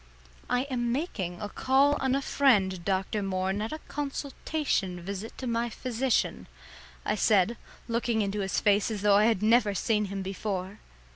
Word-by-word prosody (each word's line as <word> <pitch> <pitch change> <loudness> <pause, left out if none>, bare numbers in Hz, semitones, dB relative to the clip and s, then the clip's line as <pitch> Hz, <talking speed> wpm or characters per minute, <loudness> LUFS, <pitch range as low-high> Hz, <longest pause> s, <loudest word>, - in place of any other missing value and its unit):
"I 250 0 +2
am 245 -4 -2
making 200 - -3
a - - -2
call 270 +6 +3
on 265 0 +1
a 275 - -1
friend, 195 -12 +2
Dr. 195 +3 -1
Moore, 190 -1 -1
and 200 - -2
not 215 +1 -3
a 310 - -3
consultation 280 - -2
visit 200 +4 -6
to 260 - -5
my 235 0 0
physician," 250 +2 -1 0.6
I - - +1
said, 210 +1 +3 0.3
looking 230 -1 0
into 200 +1 -2
his 195 -1 0
face 205 0 +3
as 210 -3 -4
though 205 -1 +6
I 210 - +5
had 220 -3 +2
never 220 -2 +4
seen 210 +3 +1
him 195 0 -4
before. 195 0 -4
215 Hz, 170 wpm, -28 LUFS, 195-250 Hz, 0.6 s, though